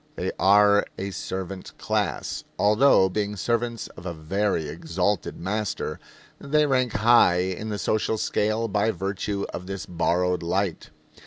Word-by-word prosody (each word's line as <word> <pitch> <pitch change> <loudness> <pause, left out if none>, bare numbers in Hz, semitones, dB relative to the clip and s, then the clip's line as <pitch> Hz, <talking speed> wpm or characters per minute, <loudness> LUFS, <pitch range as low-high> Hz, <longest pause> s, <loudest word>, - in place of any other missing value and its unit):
They - - -2
are 100 +1 +5
a 100 +1 -4
servant 95 0 -6
class, - - -2
although, 105 -1 +5
being 105 +2 -2
servants 115 +2 -1
of 90 - -10
a 85 - -4
very 85 +1 -1
exalted 85 +6 -2
master, 105 +3 -3 0.4
they 150 +2 +2
rank 130 -4 +1
high 110 -4 +5
in 95 +4 -3
the 105 - -2
social 110 +2 0
scale 110 +2 0
by 105 +1 +1
virtue 100 +1 -2
of 90 - -6
this 95 0 -5
borrowed 90 +1 0
light. 90 +1 -2
100 Hz, 140 wpm, -25 LUFS, 90-110 Hz, 0.4 s, are